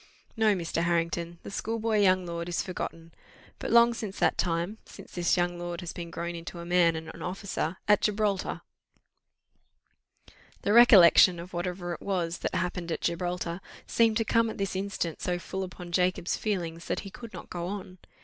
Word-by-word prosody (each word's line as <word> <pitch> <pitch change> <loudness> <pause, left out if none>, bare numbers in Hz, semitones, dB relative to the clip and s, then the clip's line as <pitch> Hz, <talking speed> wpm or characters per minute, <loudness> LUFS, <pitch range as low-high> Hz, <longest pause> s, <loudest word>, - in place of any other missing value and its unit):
"No, 220 -3 +3
Mr. 165 -2 -2
Harrington, 170 0 -1
the - - -8
schoolboy 225 +1 -1
young 185 -2 +4
lord 170 0 -4
is 175 - -1
forgotten. 165 -2 -6 0.5
But - - -4
long 235 0 +6
since 215 -4 -6
that - - +2
time, 175 +5 -1
since - - -13
this 175 0 +1
young 175 0 0
lord 175 -1 -4
has 175 - -6
been 170 -1 -6
grown 170 +1 -4
into 170 +1 -7
a 170 - -7
man, 175 -1 +3
and 160 0 -6
an - - -12
officer 185 -2 -3
at 210 -1 +5
Gibraltar 210 -2 0 1.4
" - - -27
The 205 - +2
recollection 190 -6 +8
of 180 +2 -9
whatever 175 0 -3
it - - -8
was 175 -4 -2
that - - -3
happened 175 -1 -2
at - - -2
Gibraltar 175 0 -2 0.2
seemed 225 -2 +3
to 225 - 0
come 230 +1 +2
at - - -6
this 195 -1 -2
instant 190 -4 -3
so 180 -1 0
full 190 +2 -5
upon 180 -2 -7
Jacob's 180 0 +1
feelings, 175 -5 -3
that - - -2
he 195 - -9
could 230 +1 -10
not - - -10
go 175 -1 -3
on. 185 -2 -6
180 Hz, 190 wpm, -28 LUFS, 170-200 Hz, 1.4 s, recollection